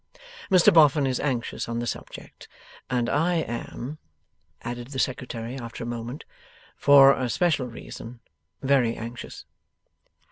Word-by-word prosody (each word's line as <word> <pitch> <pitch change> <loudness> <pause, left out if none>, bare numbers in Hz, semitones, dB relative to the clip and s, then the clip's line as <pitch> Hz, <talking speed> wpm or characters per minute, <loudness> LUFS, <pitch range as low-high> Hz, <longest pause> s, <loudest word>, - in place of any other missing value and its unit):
Mr 190 +1 +6
Boffin 150 -3 +5
is 130 -2 0
anxious 125 -5 -2
on 115 - -2
the 120 - -2
subject. - - -8 0.4
And 125 -2 0
I 165 +7 +1
am,' 140 0 -4 0.6
added 120 +1 -5
the 135 0 -7
Secretary 125 -2 -3
after 115 -1 -7
a - - -5
moment, 120 +3 -6 0.5
'for 140 -1 +7
a 130 -2 -2
special 155 -4 +1
reason, 115 0 -10 0.4
very 130 -4 +3
anxious. 115 +2 -8
125 Hz, 130 wpm, -25 LUFS, 120-145 Hz, 0.6 s, for